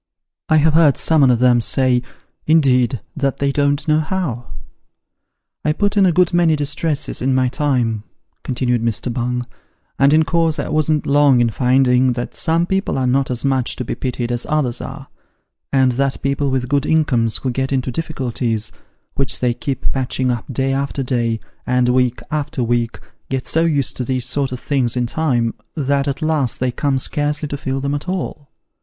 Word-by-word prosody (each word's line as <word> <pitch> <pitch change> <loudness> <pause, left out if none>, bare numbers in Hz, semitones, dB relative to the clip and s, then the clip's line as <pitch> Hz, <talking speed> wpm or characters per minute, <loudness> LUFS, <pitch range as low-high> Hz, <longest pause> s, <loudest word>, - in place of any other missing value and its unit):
I 155 - +5
have 155 0 +3
heard 155 -4 +5
some 160 -2 +3
on 135 - +5
'em 120 -1 +5
say, 125 +1 +2 0.5
indeed, 130 - +3
that 140 -2 -1
they 140 0 0
don't 145 +1 0
know 155 0 +3
how! 155 -7 -3 0.6
" - - -59
I 150 - +1
put 205 +4 0
in 195 -2 +5
a - - +4
good 180 +1 +2
many 170 -2 +3
distresses 150 0 -2
in 130 +1 +1
my 130 -1 +2
time 125 -6 0 0.4
(continued 125 -2 -1
Mr. 115 +1 -2
Bung), 125 0 -2 0.5
and 140 +1 +5
in 155 +1 +4
course 165 -1 +1
I 140 - -3
wasn't 155 0 +1
long 140 -2 +4
in 120 -1 +2
finding, 125 +1 +3
that 120 0 -5
some 165 +1 +1
people 190 -4 -1
are 130 - 0
not 135 +2 +1
as 125 +1 -2
much 130 -3 +1
to 125 - -5
be - - -3
pitied 125 -2 -3
as 120 -1 -2
others 145 -6 0
are, - - -8 0.6
and 130 -2 +3
that 135 +2 -1
people 140 0 0
with 130 -1 -1
good 140 +1 0
incomes 125 -8 +2
who 130 - -2
get 130 +2 -2
into 130 -1 -1
difficulties, 120 -7 -2 0.4
which 135 -1 0
they 125 -1 +1
keep 135 +3 -3
patching 130 -1 -1
up 120 +2 -4
day 135 +2 0
after 140 0 -2
day, 120 -3 -1 0.3
and 125 0 +2
week 125 -1 +1
after 145 -4 -2
week, 120 0 -1 0.3
get 130 -1 -2
so 165 +1 +1
used 145 -5 0
to 125 - -1
these 125 0 -1
sort 135 +1 0
of 125 - -5
things 130 -4 0
in 125 - +1
time, 120 -4 0 0.2
that 140 -2 0
at 140 +3 -2
last 155 -6 0
they 130 0 0
come 140 +2 0
scarcely 150 +3 -1
to 145 - -4
feel 135 -1 -3
them 140 +1 -2
at 145 +5 -4
all. 165 -6 -4
135 Hz, 190 wpm, -19 LUFS, 125-150 Hz, 0.6 s, I